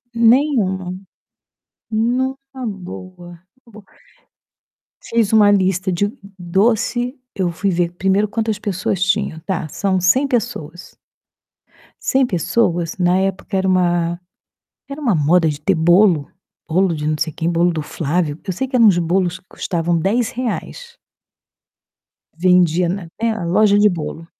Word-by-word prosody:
nenhuma. 225 -7 +2 0.9
Numa 260 +3 -2
boa, 180 -3 -9 0.3
numa 215 -2 -14
boa. - - -25 1.2
Fiz 230 -2 0
uma 210 -2 +6
lista 190 -1 +1
de 200 +4 0 0.3
doce, 225 +8 0 0.2
eu 185 -3 -1
fui 165 +4 -1
ver 175 -1 0
primeiro 195 +3 +1
quantas 220 -1 -2
pessoas 195 -2 -2
tinham: 195 -3 0
"Tá, 175 -3 -3
são 190 +4 -1
100 255 +11 +3
pessoas" 215 - -4 1.1
"100 265 0 +3
pessoas?", 175 -3 0
na 180 0 +2
época 195 +1 -2
era 190 0 +1
uma 175 -2 +1 0.7
era 275 +2 -7
uma 245 -9 +1
moda 160 +2 +3
de 145 0 -6
ter 195 +5 +1
bolo, 175 -1 +3 0.4
bolo 180 +1 +1
de 150 -1 -4
não 155 0 0
sei 160 +1 -1
quem, 165 +3 -2
bolo 175 +1 +2
do 160 -2 -3
Flávio. 155 0 -2
Eu 185 - -1
sei 265 - -2
que 260 - -15
eram 230 -2 +6
uns 195 -4 +5
bolos 175 +1 0
que - - -31
custavam 170 -1 -1
R$10. 245 - -3 1.4
Vendia 180 -1 +3
na 185 -1 -4
É, 230 -1 +2
a 215 -5 -4
loja 205 +3 +3
de 210 - +5
bolo. 165 -2 -5
185 Hz, 140 wpm, -19 LUFS, 175-220 Hz, 1.4 s, uma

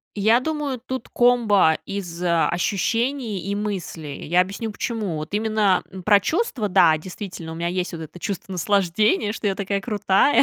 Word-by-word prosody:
Я 220 +4 +4
думаю, 295 -2 -2
тут 260 +2 -6
комбо 220 -9 +4
из 180 -4 -5
ощущений 200 - 0
и 200 - 0
мыслей, 185 -8 -4
и - - -8
я 175 +3 +4
объясню 200 +4 -5
почему. 210 -5 -3
Вот 155 +3 -6
именно, 210 -3 +2
м, 190 -1 -9
про 205 +1 +5
чувства- 285 - -1
да, 175 -5 +5
действительно, 175 -1 -7
у - - -7
меня 170 +1 -2
есть 180 +1 -2
вот 165 -1 -6
это 160 +3 -10
чувство 195 +1 -5
наслаждения, 200 +3 +1
что 215 - -4
я 195 - +1
такая 200 0 -2
крутая, 205 +5 +3
200 Hz, 175 wpm, -23 LUFS, 180-220 Hz, -, про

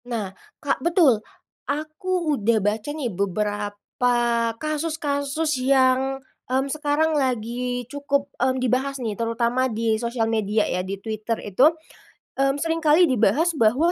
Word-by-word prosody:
Nah, 215 -6 -3 0.2
Kak, - - -2
betul, 330 - +4 0.5
aku 310 +3 -1
udah 225 +1 +2
baca 210 +5 -1
nih 290 -7 -3
beberapa 205 +5 -1 0.4
kasus-kasus 305 -1 -2
yang, 265 0 +3 0.3
mmm, 260 +1 +1
sekarang 305 +1 +1
lagi 245 -2 -1
cukup, 280 +2 -2
mmm, 260 +1 +2
dibahas 260 +2 0
nih 230 -5 -3
terutama 235 +4 0
di 225 -1 0
sosial 235 -1 -1
media 215 -1 +1
ya 180 - -1
di 190 +2 -5
Twitter 220 +2 -3
itu. 250 +9 +5 0.7
Mmm, 275 0 +3
sering 330 0 0
kali 315 +2 +5
dibahas 270 +8 +3
bahwa 255 +10 +3
255 Hz, 130 wpm, -23 LUFS, 225-290 Hz, 0.7 s, itu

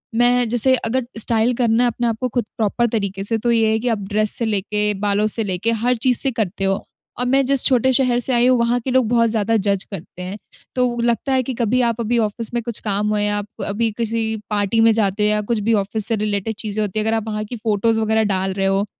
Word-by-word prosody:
मैं 245 +1 +3
जैसे 245 +3 +5
अगर 245 +2 -1
स्टाइल 225 +2 +2
करना 235 -1 +2
है - - +3
अपने 235 +1 -2
आपको 230 +2 -1
खुद 240 -1 -2
प्रॉपर 230 +2 +1
तरीके 200 -4 -3
से 225 +3 -1
तो 235 +2 0
ये 225 -2 +2
है 220 - +1
कि 245 - -4
आप 225 - 0
ड्रेस 215 0 +2
से 235 - 0
लेके, 210 0 0
बालों 205 +1 0
से 225 +1 +1
लेके 195 +3 -1
हर 235 +2 0
चीज़ 245 +1 +1
से 270 - 0
करते 210 -5 -3
हो। 195 0 0 0.4
और 250 - 0
मैं 270 +2 +2
जिस 275 0 +3
छोटे 260 -1 +3
शहर 250 -2 +2
से 255 +2 +1
आई 240 +1 +3
हूँ, 255 0 +4
वहाँ 235 +1 +1
के 260 - -4
लोग 260 -2 +2
बहुत 230 -1 +3
ज़्यादा 220 0 0
जज 200 -2 0
करते 180 -1 -9
हैं। 185 +3 -6 0.4
तो 250 -1 0
लगता 235 +3 0
है 260 -1 +2
कि 260 - -4
कभी 240 +1 0
आप 235 -1 0
अभी 235 +1 0
ऑफिस 220 +1 -2
में 240 - -1
कुछ 235 -1 -2
काम 205 +1 0
हो 210 - 0
या 205 0 0
आप 205 0 -4 0.2
अभी 220 +3 -1
किसी 230 -1 -1 0.3
पार्टी 205 +1 0
में 225 - +5
जाते 210 -1 0
हो 210 - +3
या 210 0 +1
कुछ 230 - +1
भी 230 - +3
ऑफिस 205 +1 -1
से 230 - +1
रिलेटेड 210 0 -2
चीज़ें 215 0 -3
होती 210 +1 -2
हैं 215 - -1
अगर 220 0 +1
आप 220 0 -5
वहाँ 215 -1 -3
की 245 - -7
फोटोज़ 220 +1 0
वगैरह 220 0 +1
डाल 190 0 -1
रहे 195 0 -2
हो, 195 +1 +1
225 Hz, 260 wpm, -19 LUFS, 210-240 Hz, 0.4 s, जैसे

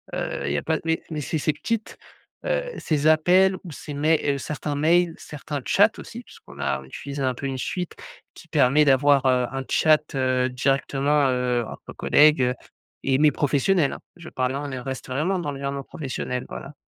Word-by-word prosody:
heu, - - -3
il 70 - -1
y - - 0
a - - -1
pas 160 0 0
mais 165 0 0
mais 155 -1 -3
c'est 155 +3 -2
ces 155 - +1
petites, 225 +5 -4 0.5
heu, - - 0 0.2
ces 150 -2 -1
appels 180 +5 +4
ou 175 - -9
ces 145 0 -8
mails, 155 +2 +2 0.2
heu, - - -3
certains 150 +1 -4
mails, 165 +3 +3
certains 145 -1 -6
chats - - +4
aussi - - -9
puisqu'on 70 - -16
a 70 -1 -1
on - - -13
utilise 140 - -7
un 130 -1 +1
peu 140 - -6
une 135 -1 -3
suite 180 +5 -4 0.4
qui - - -14
permet 150 -1 +4
d'avoir, 140 0 +4
heu, 125 -1 +3
un 135 0 -4
chat, 155 -2 +2
heu, 130 -1 +1
directement, 135 +3 +1
heu, 125 -2 0
entre - - -10
collègues, 150 -1 +4
heu 125 +1 +1 0.5
et 135 -1 +2
mais 150 +1 +5
professionnels, 145 +3 +1
hein. - - -8 0.2
Je 170 - -11
parle 130 0 -1
là, 140 - -3
on 135 -3 -5
reste 130 0 -6
vraiment 155 +9 -1
dans 150 -4 -3
l'environnement 140 0 -4
professionnel, 125 -3 -5
voilà. 140 - -8
145 Hz, 200 wpm, -24 LUFS, 130-155 Hz, 0.5 s, mais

